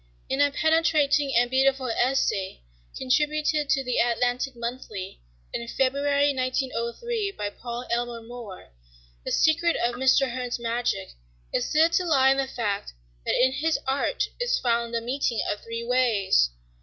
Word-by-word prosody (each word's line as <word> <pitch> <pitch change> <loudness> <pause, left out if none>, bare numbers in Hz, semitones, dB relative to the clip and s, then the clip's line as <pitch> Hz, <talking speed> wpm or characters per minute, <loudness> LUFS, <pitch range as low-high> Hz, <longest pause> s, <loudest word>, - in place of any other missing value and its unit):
In 270 +2 +1
a 285 - +5
penetrating 305 -2 +2
and 240 +1 +3
beautiful 265 0 +2
essay 225 - 0 0.3
contributed 300 +2 +1
to 275 -3 +2
the 250 -1 -1
"Atlantic 245 +2 0
Monthly" 235 - -6 0.3
in 235 - -4
February, 280 +3 +1
1903, 260 - -2
by 205 - -4
Paul 240 +2 -6
Elmer 235 -1 -2
More, 225 - -10 0.5
the - - -4
secret 335 +2 +3
of 240 +1 0
Mr. 265 +1 +3
Hearn's 250 -1 -3
magic 235 - -2 0.4
is - - 0
said 320 +2 +3
to 365 - +2
lie 270 -5 +4
in 270 - +2
the 270 -1 0
fact 205 - -3 0.3
that - - +2
in 260 +1 +4
his 310 +4 0
art 275 - 0
is - - +1
found 235 -1 0
"the 230 -1 -1
meeting 245 -1 -1
of 205 - -2
three 230 0 -5
ways." 230 - +2
255 Hz, 150 wpm, -25 LUFS, 235-285 Hz, 0.5 s, a